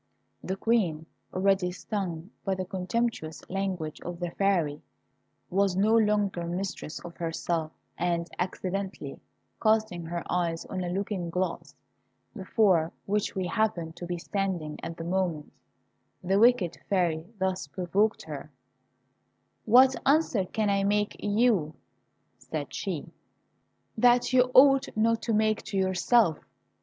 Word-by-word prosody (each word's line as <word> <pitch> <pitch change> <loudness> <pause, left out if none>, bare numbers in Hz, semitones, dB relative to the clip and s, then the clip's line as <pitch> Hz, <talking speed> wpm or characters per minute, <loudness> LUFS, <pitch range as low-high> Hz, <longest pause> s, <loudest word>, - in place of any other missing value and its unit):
The 190 - -2
Queen, 195 -8 +1 0.3
already 190 -1 +2
stung 185 -2 -4
by 195 -1 0
the 185 0 -3
contemptuous 185 -3 -3
language 185 -5 -3
of 175 -1 -6
the 175 -1 -3
Fairy, 170 -7 +1 0.7
was 195 0 +2
no 210 +4 +3
longer 210 -5 +2
mistress 180 -3 -4
of 170 - -9
herself, 165 -1 -2 0.3
and 170 -1 0
accidentally 185 -4 -3 0.4
casting 215 -6 +1
her 170 +1 -4
eyes 170 -2 -1
on 185 -1 -4
a 175 - -3
looking 190 -1 -2
glass, 180 0 -3 0.6
before 190 -5 +2
which 205 +1 -1
we 190 -1 -1
happened 175 -5 -1
to 175 - -6
be 175 0 -2
standing 175 -4 -3
at 165 0 -6
the 165 - -5
moment, 170 -4 -2 0.7
the 190 +2 +2
wicked 230 -7 +4
Fairy 170 -5 +1
thus 190 -5 -1
provoked 190 +7 0
her: - - -7 1.2
"What 255 +4 +6
answer 275 -9 +3
can 210 +2 0
I 200 0 +2
make 205 +1 +1
you," 205 -7 +2 0.6
said - - -5
she, - - -4 0.8
"that 245 +2 +4
you 250 0 +5
ought 275 +1 +7
not 230 +1 +2
to 230 - -1
make 215 0 +2
to 200 - -3
yourself? 190 -1 +3
190 Hz, 130 wpm, -28 LUFS, 175-215 Hz, 1.2 s, ought